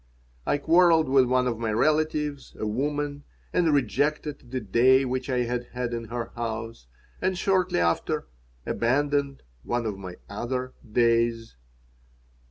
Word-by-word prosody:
I -, -, +2 dB
quarreled 165 Hz, +1 st, +4 dB
with 130 Hz, -1 st, +5 dB
one 125 Hz, 0 st, +2 dB
of 120 Hz, -3 st, -1 dB
my 115 Hz, -2 st, -1 dB
relatives, 150 Hz, +2 st, 0 dB
a -, -, -3 dB
woman, 145 Hz, +5 st, -2 dB, 0.3 s
and 170 Hz, -3 st, +3 dB
rejected 145 Hz, +1 st, 0 dB
the 130 Hz, +1 st, -2 dB
"day" 130 Hz, +5 st, +4 dB
which 130 Hz, +1 st, -3 dB
I 125 Hz, -1 st, +1 dB
had 120 Hz, 0 st, -2 dB
had 125 Hz, -1 st, -3 dB
in 115 Hz, -1 st, -4 dB
her 120 Hz, +1 st, -5 dB
house, 115 Hz, -, -5 dB, 0.3 s
and 185 Hz, 0 st, 0 dB
shortly 185 Hz, -, +1 dB
after 85 Hz, -1 st, 0 dB, 0.4 s
abandoned 140 Hz, -, 0 dB, 0.2 s
one 120 Hz, -, -2 dB
of 105 Hz, -3 st, -3 dB
my 90 Hz, -2 st, -7 dB
other 125 Hz, +5 st, -3 dB, 0.2 s
"days." 115 Hz, -, +2 dB
125 Hz, 140 wpm, -26 LUFS, 115-145 Hz, 0.4 s, with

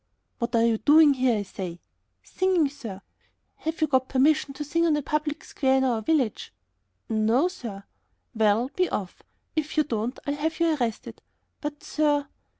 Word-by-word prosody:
"What 235 Hz, +1 st, -1 dB
are 230 Hz, 0 st, +4 dB
you 225 Hz, -2 st, +2 dB
doing 295 Hz, +4 st, +6 dB
here, 255 Hz, -3 st, +2 dB
I 205 Hz, -, -2 dB
say?" 180 Hz, -3 st, -7 dB, 0.4 s
"Singing, 365 Hz, -5 st, +1 dB
sir." 225 Hz, -9 st, -9 dB, 0.5 s
"Have 320 Hz, +1 st, -4 dB
you -, -, +5 dB
got 260 Hz, -3 st, +1 dB
permission 285 Hz, +2 st, +3 dB
to 295 Hz, -, -4 dB
sing 330 Hz, +3 st, 0 dB
on 305 Hz, -2 st, +3 dB
a 295 Hz, -, -3 dB
public 300 Hz, +2 st, -2 dB
square 265 Hz, -1 st, +1 dB
in 265 Hz, -, +2 dB
our 240 Hz, -4 st, +1 dB
village?" 260 Hz, -3 st, 0 dB, 0.6 s
"No, 225 Hz, +8 st, +2 dB
sir." 225 Hz, -, -7 dB, 0.5 s
"Well, 220 Hz, +3 st, +2 dB
be 365 Hz, -1 st, +1 dB
off; 190 Hz, -3 st, -4 dB, 0.3 s
if 310 Hz, 0 st, -2 dB
you 305 Hz, -, +5 dB
don't 235 Hz, -2 st, -3 dB
I'll 285 Hz, -, -1 dB
have 315 Hz, +3 st, -2 dB
you 335 Hz, -2 st, +3 dB
arrested." 240 Hz, -6 st, -4 dB, 0.4 s
"But, 295 Hz, 0 st, -6 dB
sir...." 295 Hz, -2 st, +1 dB
275 Hz, 170 wpm, -26 LUFS, 230-305 Hz, 0.6 s, doing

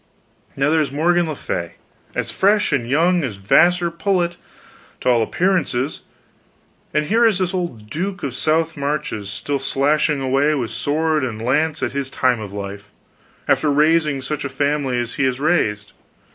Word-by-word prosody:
Now 140 Hz, +2 st, +1 dB
there's 155 Hz, -3 st, +1 dB
Morgan 170 Hz, +4 st, +2 dB
le 155 Hz, -, -3 dB
Fay, 85 Hz, -9 st, -4 dB, 0.4 s
as -, -, -2 dB
fresh 205 Hz, +2 st, +2 dB
and 120 Hz, -4 st, 0 dB
young 170 Hz, +5 st, +3 dB
as 110 Hz, -8 st, -4 dB
a -, -, -18 dB
Vassar 170 Hz, -, +3 dB
pullet, 175 Hz, 0 st, 0 dB, 0.7 s
to -, -, +1 dB
all 120 Hz, -2 st, +4 dB
appearances, 155 Hz, -, 0 dB, 0.9 s
and 150 Hz, 0 st, +1 dB
here 225 Hz, +9 st, +2 dB
is 220 Hz, -5 st, +4 dB
this 185 Hz, -1 st, -1 dB
old 170 Hz, -, -4 dB
duke 185 Hz, -, -4 dB
of 140 Hz, -, -2 dB
the -, -, -9 dB
South 160 Hz, +3 st, +1 dB
Marches 140 Hz, -8 st, -3 dB
still 135 Hz, +9 st, -3 dB
slashing 140 Hz, +2 st, +1 dB
away 135 Hz, +3 st, +2 dB
with 120 Hz, -5 st, -3 dB
sword 155 Hz, 0 st, 0 dB
and 115 Hz, -4 st, -3 dB
lance 150 Hz, +7 st, 0 dB
at -, -, 0 dB
his 140 Hz, -1 st, -3 dB
time 125 Hz, -3 st, +1 dB
of 105 Hz, -3 st, -7 dB
life, 100 Hz, 0 st, -7 dB, 0.6 s
after 155 Hz, -, +2 dB
raising 150 Hz, -1 st, +2 dB
such 150 Hz, +2 st, -3 dB
a 140 Hz, -, -3 dB
family 140 Hz, -1 st, 0 dB
as 120 Hz, 0 st, -2 dB
he -, -, +1 dB
has 130 Hz, -1 st, 0 dB
raised. 105 Hz, -10 st, 0 dB
145 Hz, 175 wpm, -20 LUFS, 125-165 Hz, 0.9 s, all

